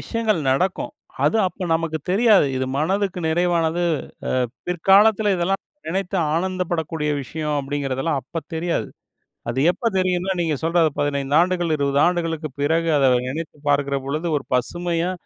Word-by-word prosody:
விஷயங்கள் 220 Hz, -7 st, -1 dB
நடக்கும். 180 Hz, +8 st, 0 dB, 0.3 s
அது 225 Hz, -, +3 dB
அப்ப 185 Hz, 0 st, -4 dB
நமக்கு 160 Hz, -1 st, -1 dB
தெரியாது. 205 Hz, -5 st, +5 dB
"இது 130 Hz, -, -1 dB
மனதுக்கு 190 Hz, +3 st, 0 dB
நிறைவானது, 170 Hz, 0 st, +1 dB, 0.7 s
அ -, -, -21 dB, 0.2 s
பிற்காலத்துல 200 Hz, +4 st, +4 dB
இதெல்லாம் 185 Hz, +3 st, 0 dB, 0.3 s
நினைத்து 190 Hz, +2 st, -2 dB, 0.2 s
ஆனந்தப்படக்கூடிய 165 Hz, -4 st, -2 dB
விஷயம்." 150 Hz, +2 st, -3 dB
அப்படிங்குறதெல்லாம் 140 Hz, +1 st, -2 dB
அப்ப 165 Hz, +6 st, -6 dB
தெரியாது. 170 Hz, +1 st, -1 dB, 0.6 s
அது 125 Hz, +3 st, -2 dB
எப்ப 230 Hz, +6 st, -1 dB
தெரியும்னா, 185 Hz, 0 st, +1 dB
நீங்க 160 Hz, -3 st, 0 dB
சொல்ற 170 Hz, +1 st, +2 dB, 0.2 s
15 140 Hz, 0 st, 0 dB
ஆண்டுகள், 175 Hz, -2 st, 0 dB
20 140 Hz, 0 st, +1 dB
ஆண்டுகளுக்குப் 165 Hz, -5 st, -2 dB
பிறகு 165 Hz, +3 st, +1 dB
அத 135 Hz, -2 st, +4 dB, 0.2 s
நினைத்து 155 Hz, +2 st, -6 dB
பார்க்குற 140 Hz, -1 st, +1 dB
பொழுது 155 Hz, +5 st, -2 dB
ஒரு 135 Hz, -, -7 dB
பசுமையா, 175 Hz, +6 st, -1 dB
165 Hz, 135 wpm, -22 LUFS, 145-185 Hz, 0.7 s, தெரியாது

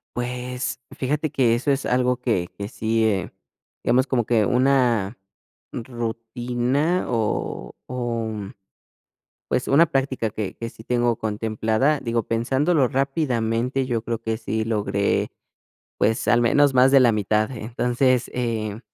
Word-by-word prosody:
Pues 125 Hz, +1 st, -3 dB, 0.2 s
fíjate 145 Hz, +3 st, -1 dB
que 125 Hz, -5 st, +3 dB
eso 130 Hz, +4 st, 0 dB
es 140 Hz, 0 st, -1 dB
algo 125 Hz, 0 st, +2 dB
que 115 Hz, -8 st, -1 dB
que 100 Hz, -, -5 dB
sí 110 Hz, +1 st, 0 dB
eh, 100 Hz, -4 st, 0 dB, 0.5 s
hemos, 130 Hz, +1 st, +3 dB
como 125 Hz, -4 st, 0 dB
que 110 Hz, -3 st, +2 dB
una 125 Hz, -5 st, +2 dB, 0.5 s
rutina 120 Hz, +6 st, -2 dB
o 115 Hz, -3 st, -2 dB
o 120 Hz, -3 st, -2 dB, 1.2 s
pues, 125 Hz, -, -1 dB
una 155 Hz, +5 st, +6 dB
práctica 135 Hz, -5 st, -1 dB
que 105 Hz, -2 st, -4 dB
que 115 Hz, -, -5 dB
sí 110 Hz, -, -14 dB
tengo 120 Hz, 0 st, +1 dB
contemplada, 110 Hz, +6 st, 0 dB
digo, 115 Hz, -1 st, -1 dB
pensándolo 130 Hz, +5 st, +1 dB
rápidamente, 130 Hz, -2 st, 0 dB
yo 120 Hz, -3 st, -1 dB
creo 115 Hz, -1 st, -3 dB
que 110 Hz, -1 st, -2 dB
sí 110 Hz, -1 st, -2 dB
logré, 105 Hz, -2 st, 0 dB, 0.7 s
pues, 110 Hz, +1 st, +1 dB
al 120 Hz, -, +4 dB
menos 140 Hz, +4 st, +4 dB
más 130 Hz, +1 st, +6 dB
de 135 Hz, -, +7 dB
la 120 Hz, -2 st, +5 dB
mitad. 110 Hz, +2 st, +1 dB
Entonces, 125 Hz, +2 st, 0 dB
eh, 110 Hz, -4 st, -2 dB
120 Hz, 135 wpm, -23 LUFS, 110-130 Hz, 1.2 s, de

